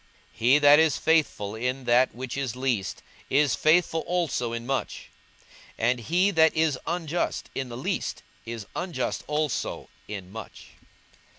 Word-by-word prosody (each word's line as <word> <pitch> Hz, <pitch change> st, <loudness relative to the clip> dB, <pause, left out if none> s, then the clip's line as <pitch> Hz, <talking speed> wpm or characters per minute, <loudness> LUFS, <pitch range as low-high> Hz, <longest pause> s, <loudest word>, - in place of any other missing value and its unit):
42:016:010 -, -, -26 dB
He 125 Hz, +5 st, +5 dB
that 145 Hz, 0 st, +7 dB
is 160 Hz, -3 st, +3 dB
faithful 150 Hz, -11 st, +1 dB
in 125 Hz, +4 st, -2 dB
that 120 Hz, +1 st, +3 dB
which 125 Hz, 0 st, -5 dB
is 135 Hz, -4 st, -3 dB
least 125 Hz, -6 st, -2 dB, 0.3 s
is 140 Hz, -1 st, +3 dB
faithful 165 Hz, +1 st, +3 dB
also 165 Hz, -9 st, -1 dB
in 115 Hz, 0 st, -4 dB
much: 135 Hz, +1 st, -3 dB, 0.7 s
and 120 Hz, +2 st, +1 dB
he 180 Hz, -, +2 dB
that 160 Hz, -3 st, +4 dB
is 155 Hz, -5 st, +2 dB
unjust 170 Hz, -1 st, -2 dB
in 130 Hz, -2 st, -4 dB
the 120 Hz, -, -7 dB
least 130 Hz, -, -3 dB, 0.2 s
is 115 Hz, -1 st, -6 dB
unjust 175 Hz, -1 st, -3 dB
also 150 Hz, -3 st, -2 dB, 0.2 s
in 95 Hz, -3 st, -7 dB
much. 110 Hz, 0 st, -10 dB
135 Hz, 150 wpm, -26 LUFS, 120-160 Hz, 0.7 s, that